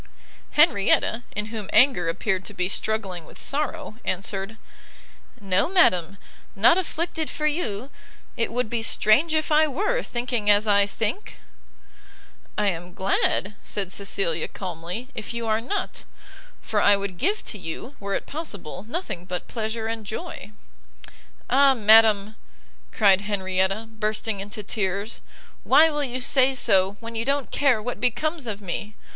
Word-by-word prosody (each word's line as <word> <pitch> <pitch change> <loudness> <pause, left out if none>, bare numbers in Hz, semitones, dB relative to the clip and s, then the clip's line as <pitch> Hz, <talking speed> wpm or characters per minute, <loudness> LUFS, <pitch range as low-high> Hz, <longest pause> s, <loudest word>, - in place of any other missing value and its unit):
Henrietta, 240 - +3
in 210 0 -1
whom 215 -3 -6
anger 250 -11 +4
appeared 190 +2 -1
to - - -8
be 180 - 0
struggling 195 -3 -2
with - - -15
sorrow, 295 -4 -3
answered, 195 +3 -3 0.8
"No, 195 - +1
madam, 200 - +3 0.4
not 225 +11 +6
afflicted 335 -3 -2
for 305 - -3
you! 275 - -2 0.4
it 230 - -1
would 245 0 0
be 230 +1 -1
strange 265 +8 +4
if 310 0 0
I 310 +1 +5
were, 420 - 0
thinking 240 - -2
as 205 +1 +5
I 200 -1 +4
think!" 225 - -3 1.2
"I 210 -1 +2
am 175 0 -6
glad," 195 +1 +1
said 195 -3 -4
Cecilia, 190 -5 -1
calmly, 180 +6 -6
"if 220 +1 -6
you 235 0 -3
are 220 0 +1
not, 370 - -4 0.6
for - - 0
I 205 - +6
would 200 -3 -5
give 400 +8 0
to 210 - -4
you, 180 - -7
were 200 0 -3
it - - -3
possible, 205 - -6
nothing 240 - -4
but 180 0 -5
pleasure 220 0 -3
and 225 0 -3
joy." 220 - -6 1.0
"Ah 275 -1 +5
madam!" 215 -1 +5 0.5
cried 195 -3 +4
Henrietta, 195 +1 -1
bursting 215 -1 -2
into 205 +2 -6
tears, 200 +1 -3 0.4
"why 320 +1 +6
will 295 -1 -1
you 255 -1 -4
say 265 +1 +3
so 195 -6 +3
when 230 0 -8
you 225 0 -2
don't 280 +1 -1
care 275 -6 +3
what 245 +3 -5
becomes 260 +4 -1
of 210 -2 -4
me! 205 +3 -5
220 Hz, 150 wpm, -24 LUFS, 195-265 Hz, 1.2 s, not